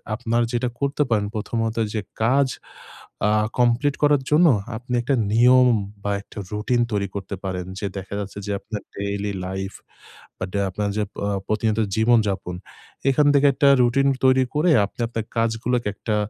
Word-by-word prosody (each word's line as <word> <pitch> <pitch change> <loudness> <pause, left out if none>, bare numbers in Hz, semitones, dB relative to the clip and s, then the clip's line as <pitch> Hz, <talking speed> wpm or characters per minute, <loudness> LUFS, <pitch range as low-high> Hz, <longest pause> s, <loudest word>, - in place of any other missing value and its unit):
আপনার 120 0 0
যেটা 120 0 0
করতে 140 +1 +1
পারেন, 105 -3 +1
প্রথমত 115 +1 -2 0.2
যে 110 - -1 0.2
কাজ 135 +4 +3 0.8
আ - - +2 0.3
কমপ্লিট 125 +4 +2
করার 145 -2 +4
জন্য 170 +3 +6 0.3
আপনি 125 +2 -7
একটা 135 +3 +1 0.2
নিয়ম 125 +2 +6 0.4
বা 100 - -1
একটা 105 - -17
রুটিন 110 +4 0
তৈরি 100 -1 0
করতে 100 0 -4
পারেন। 90 -2 -3
যে 100 - -3
দেখা 95 +1 -7
যাচ্ছে 100 0 -6
যে - - -2
আপনার 105 +1 -6
ডেইলি 100 0 -3
লাইফ 95 +1 -4 0.6
বা - - -5
যে 100 - 0
আপনার 105 +2 -2
যে 105 - +1 0.2
অ - - 0 0.2
প্রতিনিয়ত 110 0 0 0.2
জীবন 115 +1 +5
যাপন 90 -2 -3 0.5
এখান 145 +2 +3
থেকে 140 0 +5
একটা 140 +1 +2
রুটিন 130 +3 +3 0.2
তৈরি 130 0 +5
করে 165 +3 +3
আপনি, 105 - -15
আপনার 115 -1 -4
কাজগুলোকে 115 +1 0
একটা 110 +1 -2
115 Hz, 165 wpm, -23 LUFS, 100-130 Hz, 0.8 s, জন্য